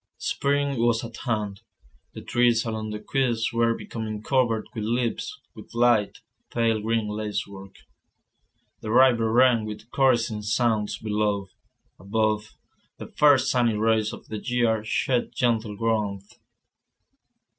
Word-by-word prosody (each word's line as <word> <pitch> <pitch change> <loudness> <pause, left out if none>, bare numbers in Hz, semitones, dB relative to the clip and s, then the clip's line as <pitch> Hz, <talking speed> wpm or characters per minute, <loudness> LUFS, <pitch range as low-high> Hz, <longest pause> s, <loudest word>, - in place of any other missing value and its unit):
Spring 140 -2 -1
was 115 0 +2
at 115 0 -9
hand; 105 -5 -2 0.5
the - - -7
trees 120 -1 +2
along 110 -1 -3
the 105 - -4
quays 120 -4 -1
were 115 0 +2
becoming 110 -2 -5
covered 120 -4 +1
with 110 - -4
leaves, 120 +1 -2
with - - -13
light, 120 -4 +2 0.3
pale 115 -2 +1
green 110 0 0
lacework. 100 -2 -5 1.1
The 110 - -6
river 120 -2 +4
ran 120 -1 +4
with 110 +2 -8
caressing 120 -5 +2
sounds 105 -2 0
below; 105 -2 -1 0.5
above, 110 +2 -1 0.5
the - - -9
first 135 -3 +5
sunny 120 -3 +2
rays 110 0 +1
of - - -11
the 110 - -5
year 115 -2 0
shed 120 +2 -1
gentle 110 -4 0
warmth. 105 -3 -2
115 Hz, 125 wpm, -25 LUFS, 105-120 Hz, 1.1 s, first